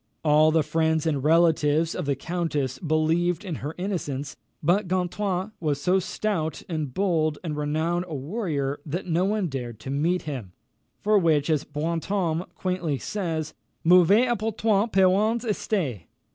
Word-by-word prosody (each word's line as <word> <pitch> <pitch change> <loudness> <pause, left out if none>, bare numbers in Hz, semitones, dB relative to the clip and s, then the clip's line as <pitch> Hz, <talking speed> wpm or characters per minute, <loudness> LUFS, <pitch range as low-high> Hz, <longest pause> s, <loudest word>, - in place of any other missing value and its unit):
All 155 0 +5
the 160 0 +3
friends 160 +1 +1
and 145 -5 0
relatives 160 0 +3
of 180 - -4
the 140 - +1
countess 150 -4 -2
believed 165 +4 +1
in 170 -6 -4
her 150 +4 -5
innocence; 155 -7 -3 0.3
but 180 +5 +2
Gontran 185 +2 -1
was 150 -4 -1
so 185 +5 +2
stout 180 -4 -2
and 155 -6 -3
bold 160 -3 +1
and 155 -4 -3
renowned 160 +4 -1
a 160 - -5
warrior 145 - -2
that 165 +4 -4
no 175 +1 +1
one 210 0 0
dared 125 -7 -5
to 135 - -5
meet 165 +6 0
him, 125 -12 -6 0.5
for 210 0 +4
which, 160 -3 +2
as 150 -3 +1
Brantôme 165 +3 -2
quaintly 180 -6 -1
says, 160 -4 -3 0.3
"mauvais 180 +7 +6
et 240 -4 0
poltrons 220 0 +1
parens 205 +5 +3
estaient." 175 - -2
165 Hz, 150 wpm, -25 LUFS, 150-185 Hz, 0.5 s, mauvais